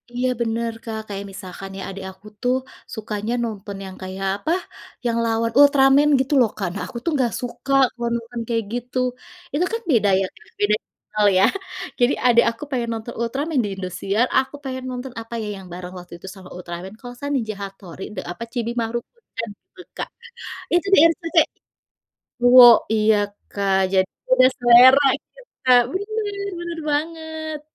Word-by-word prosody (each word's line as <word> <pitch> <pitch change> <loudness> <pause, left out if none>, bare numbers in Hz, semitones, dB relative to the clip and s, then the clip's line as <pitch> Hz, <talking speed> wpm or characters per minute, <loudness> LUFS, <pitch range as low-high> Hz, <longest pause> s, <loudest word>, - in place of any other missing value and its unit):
Iya 250 +1 +1
bener 230 0 -1
Kak 220 -1 -4
kayak 200 -1 -5
misalkan 190 0 -9
ya - - -6
adik 195 0 -7
aku 190 +3 -17
tuh 250 +1 +2 0.4
sukanya 215 0 -3
nonton 205 -3 -5
yang 190 - -9
kayak 190 +1 -5
apa 205 +11 -3 0.5
yang 235 -1 +1
lawan 230 0 0
Ultraman 280 0 +6
gitu 265 +2 0
loh 230 - +4
Kak - - -2
nah 200 - -5
aku - - -8
tuh 335 - +1
nggak 255 -4 +1
suka 250 +2 -4 0.2
kalo 240 -1 -4
nonton 235 0 -5
kayak 230 -1 0
gitu 245 +1 -4 0.6
itu 330 +5 +2
kan 455 - -1
beda 210 -5 +4
ya 195 - +1
Kak? 190 - -19
Beda 205 +1 +3 0.4
hal 210 -1 +5
ya? - - +5 0.6
Jadi 245 +2 +4
adek 235 -1 +6
aku 230 +5 -10
pengen 240 -3 -1
nonton 225 +1 -6
Ultraman 275 +6 -1
di - - -3
Indosiar 190 +4 -1
aku 265 +2 -3
pengen 260 -1 -5
nonton 250 0 -6
apa 225 +1 -11
ya? 215 - -4
Yang 190 - -11
bareng 180 0 -7
waktu 175 -1 -13
itu 190 - -12
sama 185 -1 -12
Ultraman 180 +2 -7
kalau 245 - -10
gak - - -17
salah 285 0 -4
Ninja 220 -5 -2
Hattori 195 -2 -8
de - - -3
apa? 215 - -7
Chibi 235 -2 -2
Maruko 235 +1 -3 0.3
Chan 230 0 -3 0.3
tuh 365 - -12
Kak - - -4 0.6
itu 350 +2 +2
di - - +6
RCTI, 330 0 +2 1.0
cowok 245 -1 +9 0.2
iya 215 0 +4 0.4
Kak 200 -1 0 0.2
jadi 190 0 +3 0.2
beda 255 0 +6
selera 245 +3 +8 0.2
gitu - - -22 0.3
Kak 250 -1 +7
bener 410 +2 -3 0.3
bener 345 -1 -5
banget. 315 0 -3
235 Hz, 175 wpm, -22 LUFS, 200-265 Hz, 1.0 s, cowok